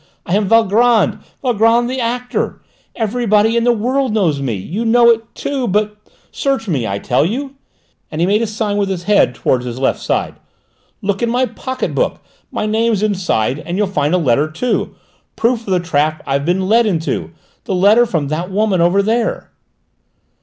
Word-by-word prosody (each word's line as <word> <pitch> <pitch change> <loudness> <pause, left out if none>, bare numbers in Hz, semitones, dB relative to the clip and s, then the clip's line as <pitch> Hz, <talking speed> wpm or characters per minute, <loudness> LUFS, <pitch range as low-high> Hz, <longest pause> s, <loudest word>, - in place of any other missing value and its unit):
"I 175 - 0
am 205 -1 +1
Valgrand, 225 0 +3 0.2
Valgrand 235 -1 +3
the 260 +1 -3
actor. 245 +1 -2 0.4
Everybody 225 -1 +1
in 235 0 +1
the 245 - +5
world 250 +1 0
knows 160 -9 +1
me. 125 -5 -2
You 170 - -4
know 235 +1 +5
it 225 0 -3
too, 270 -3 -2
but 210 +2 0 0.4
Search 270 -5 -1
me, 135 - -1
I 100 - -2
tell 125 +6 +1
you," 265 - -3 0.6
and 155 - -6
he 170 - +3
made 205 +4 +2
a 230 - 0
sign 210 -1 -2
with 200 -1 0
his 180 -2 -3
head 200 -9 +3
towards 125 -1 0
his 120 0 -5
left 130 - 0
side. - - -2 0.6
"Look 200 0 -1
in 235 - +1
my 250 +2 +2
pocket 260 +1 -4
book; - - -1 0.3
my - - -2
name's 220 -1 +1
inside; 180 - 0
and 175 +3 -5
you'll 210 - +2
find 155 -4 0
a - - +3
letter 145 -1 +1
too; 235 +11 -2 0.4
proof 230 -1 0
of - - -3
the 185 - +3
trap 155 -2 0
I've 140 +1 -1
been 185 +2 +1
led 230 +2 +4
into: 165 -5 -2 0.4
the 190 - -1
letter 210 +6 +5
from 155 -8 -2
that 165 +4 -3
woman 195 -2 +1
over 180 +4 +3
there!" 225 +2 -1
210 Hz, 185 wpm, -17 LUFS, 170-235 Hz, 0.6 s, the